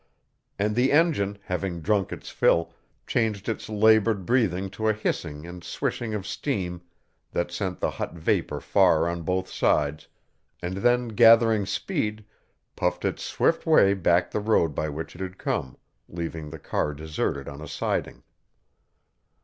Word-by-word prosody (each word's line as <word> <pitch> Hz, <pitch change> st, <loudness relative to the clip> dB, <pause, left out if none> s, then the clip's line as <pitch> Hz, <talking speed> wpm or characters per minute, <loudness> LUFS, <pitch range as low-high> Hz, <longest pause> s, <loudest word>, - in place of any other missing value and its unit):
And 105 Hz, +1 st, 0 dB
the 125 Hz, +3 st, +3 dB
engine, 145 Hz, -, +2 dB
having 90 Hz, -1 st, -3 dB
drunk 100 Hz, +2 st, 0 dB
its -, -, -7 dB
fill, 85 Hz, -, +2 dB, 0.3 s
changed 105 Hz, -3 st, -1 dB
its 115 Hz, -1 st, -3 dB
labored 110 Hz, -2 st, +3 dB
breathing 100 Hz, -6 st, +1 dB
to 110 Hz, +2 st, -2 dB
a 110 Hz, -, +4 dB
hissing 80 Hz, -7 st, -3 dB
and 85 Hz, 0 st, -9 dB
swishing 110 Hz, +3 st, -3 dB
of 100 Hz, -2 st, -4 dB
steam 90 Hz, -11 st, -3 dB, 0.5 s
that 85 Hz, 0 st, -1 dB
sent 90 Hz, 0 st, -3 dB
the -, -, 0 dB
hot -, -, -5 dB
vapor 80 Hz, -, 0 dB
far 80 Hz, +1 st, +3 dB
on 85 Hz, 0 st, -3 dB
both 95 Hz, +2 st, -1 dB
sides, 75 Hz, -3 st, 0 dB, 0.5 s
and 90 Hz, +2 st, -4 dB
then 120 Hz, +3 st, +2 dB
gathering 115 Hz, -2 st, +5 dB
speed, 110 Hz, -, -2 dB, 0.5 s
puffed -, -, -1 dB
its -, -, -1 dB
swift -, -, 0 dB
way 100 Hz, 0 st, +6 dB
back 90 Hz, -2 st, +2 dB
the -, -, -1 dB
road 105 Hz, -7 st, +2 dB
by 75 Hz, +2 st, -2 dB
which 80 Hz, +3 st, -6 dB
it 85 Hz, -, -10 dB
had 95 Hz, 0 st, -5 dB
come, 65 Hz, -, -3 dB, 0.3 s
leaving 80 Hz, -2 st, -5 dB
the 80 Hz, -, -8 dB
car 75 Hz, 0 st, -2 dB
deserted 75 Hz, -2 st, -3 dB
on 70 Hz, +1 st, -8 dB
a 80 Hz, -, -7 dB
siding. -, -, -3 dB
95 Hz, 155 wpm, -26 LUFS, 85-110 Hz, 0.5 s, way